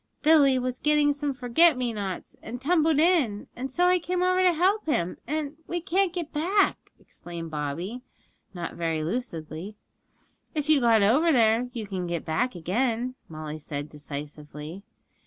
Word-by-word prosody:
'Billy 290 -4 +6
was 255 0 -2
getting 300 -1 +3
some 285 0 -2
forget 265 +5 +3
me 245 -2 -1
nots, 195 -4 -5
and 240 +3 -7
tumbled 315 +2 +2
in, 300 - +2
and 260 +2 -5
so 350 +6 +2
I 360 0 +4
came 360 +1 -1
over 365 0 +3
to 365 -1 +5
help 370 +4 +1
him, 180 - 0
and 300 0 -3
we 350 - -2
can't 375 +1 +1
get 345 -3 -5
back,' 365 +7 +1
explained 170 -2 -9
Bobby, 160 - -4 0.5
not 175 -3 -5
very 165 -2 -2
lucidly. 170 -2 -5 0.8
'If 300 0 -2
you 300 -3 +5
got 225 -3 +5
over 285 +11 +4
there 230 -1 +3
you 230 -3 -5
can 190 -3 -4
get 170 -2 -3
back 170 +10 0
again,' 235 +8 -1 0.2
Molly 155 -1 -6
said 145 -1 -5
decisively. 150 +3 -8
245 Hz, 160 wpm, -26 LUFS, -, 0.8 s, Billy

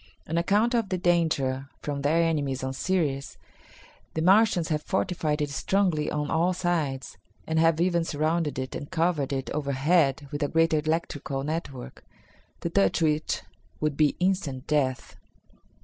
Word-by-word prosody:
On 160 - -3
account 205 +8 +2
of 230 -5 +1
the 185 - 0
danger 155 -7 +1
from 145 -1 -3
their 160 +4 +3
enemies 145 -5 -1
on 130 0 -2
Ceres, 145 -4 -1 0.8
the 160 - 0
Martians 190 -2 +4
have 150 -2 0
fortified 165 -5 -1
it 145 - -3
strongly 180 0 +1
on 150 -1 -2
all 170 +3 +2
sides, 160 - -2 0.3
and 160 0 0
have 165 -1 +3
even 170 -1 +2
surrounded 155 0 -1
it 130 0 -4
and 145 - -6
covered 165 -5 0
it 135 -1 -3
overhead 140 0 +1
with 145 0 -4
a 145 - +2
great 165 +2 +2
electrical 150 -3 -1
network, 140 -4 -5 0.6
to - - -2
touch 95 - +2
which 155 -1 0 0.4
would 150 -2 0
be 150 -1 +3
instant 180 -8 -1
death." 135 -4 -1
155 Hz, 150 wpm, -27 LUFS, 140-170 Hz, 0.8 s, Martians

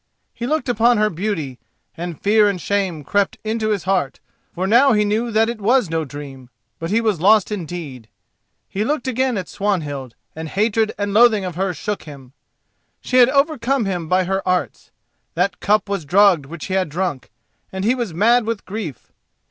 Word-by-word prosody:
He 240 - -5
looked 310 +1 -1
upon 240 0 +3
her 215 0 +2
beauty, 160 - -3 0.4
and 170 -2 -6
fear 210 0 +4
and 195 -3 -3
shame 185 -4 -1
crept 200 +6 0
into 220 0 -1
his 205 -4 -1
heart, 185 -7 -1 0.3
for 185 - -3
now 240 +6 +5
he 210 -1 +2
knew 220 +3 0
that 220 0 +2
it 235 -2 -5
was 235 -3 +2
no 160 -1 -1
dream, 135 -3 -10 0.3
but 165 - -4
he 215 +4 +2
was 215 -8 0
lost 210 +2 +4
indeed. 160 - -6 0.6
He 200 - -2
looked 290 +3 -2
again 260 -1 0
at 185 -3 -4
Swanhild, 145 - -3 0.2
and 160 0 -6
hatred 215 +3 +1
and 205 0 -2
loathing 220 -3 +5
of 180 - -4
her 190 +3 -1
shook 205 +4 -4
him. 135 -4 -12 0.7
She 255 - -1
had 245 -1 +7
overcome 275 -3 +1
him 175 -4 -3
by 185 0 +3
her 190 +2 -1
arts; 185 -1 -2 0.5
that - - 0
cup 210 +1 +2
was 200 -4 -2
drugged 180 -2 +4
which 165 +2 -8
he 190 - -4
had 190 -3 0
drunk, 165 -4 -3 0.4
and 190 +1 -4
he 235 - +4
was 240 -7 -3
mad 225 +8 +3
with 230 -3 -3
grief. 185 - -7
200 Hz, 190 wpm, -20 LUFS, 170-220 Hz, 0.7 s, had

